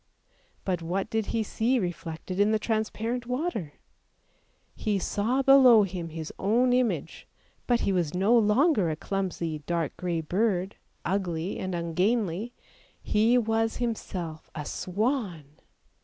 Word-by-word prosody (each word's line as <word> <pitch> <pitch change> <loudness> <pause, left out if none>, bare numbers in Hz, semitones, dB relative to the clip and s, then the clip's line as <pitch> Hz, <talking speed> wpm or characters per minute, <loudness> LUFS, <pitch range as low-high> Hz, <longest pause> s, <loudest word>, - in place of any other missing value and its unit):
But 180 -3 -1
what 180 +4 -2
did 220 -2 0
he 225 - 0
see 230 +4 0
reflected 175 -2 -4
in 205 +1 +4
the 220 - +3
transparent 225 +2 -2
water? 250 - -2 1.0
He 210 -3 -1
saw 225 +8 0
below 255 -5 +7
him 180 -3 -4
his 160 -1 -6
own 245 +5 +3
image, 250 -2 -1 0.4
but 240 -1 +2
he 195 - +1
was 175 -3 0
no 200 +6 +4
longer 220 - +3
a 155 - -1
clumsy 170 -3 -3
dark 170 -3 -1
grey 175 -2 -1
bird, 190 +2 0 0.3
ugly 180 -2 -2
and 185 -1 -3
ungainly, 185 +5 0 0.5
he 225 +4 +3
was 225 -1 +1
himself 185 -9 -4
a 150 -2 -4
swan! 200 - -2
200 Hz, 130 wpm, -27 LUFS, 175-230 Hz, 1.0 s, below